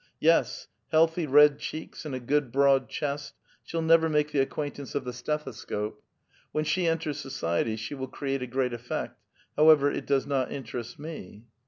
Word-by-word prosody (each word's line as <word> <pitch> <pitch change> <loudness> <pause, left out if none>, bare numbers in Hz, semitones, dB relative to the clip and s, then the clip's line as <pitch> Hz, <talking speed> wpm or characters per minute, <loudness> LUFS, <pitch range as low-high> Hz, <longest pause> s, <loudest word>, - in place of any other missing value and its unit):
Yes, - - +2 0.2
healthy 160 +1 +3
red 145 +1 +6
cheeks 155 +1 -7
and 145 -4 -4
a - - -3
good 135 +1 0
broad 135 0 +3
chest, 145 -1 -4 0.3
she'll 165 -1 -3
never 160 0 +5
make 150 -1 +1
the 140 -2 +3
acquaintiince 145 0 -5
of 140 - 0
the 125 - -4
stethoscope. 120 -6 -4 0.5
AVhen 155 0 +1
she 180 +3 +1
entera 165 -2 0
so 140 -1 -7
ciety 110 +2 -1
she 115 +5 -5
will 130 -2 -4
create 135 0 -3
a 125 - -3
great 125 0 -1
effect. 120 0 -5 0.3
However, 150 -2 +6
it - - -5
does 140 -1 +2
not 135 -3 -1
interest 120 -3 -6
me." 145 - -9
140 Hz, 175 wpm, -28 LUFS, 130-150 Hz, 0.5 s, red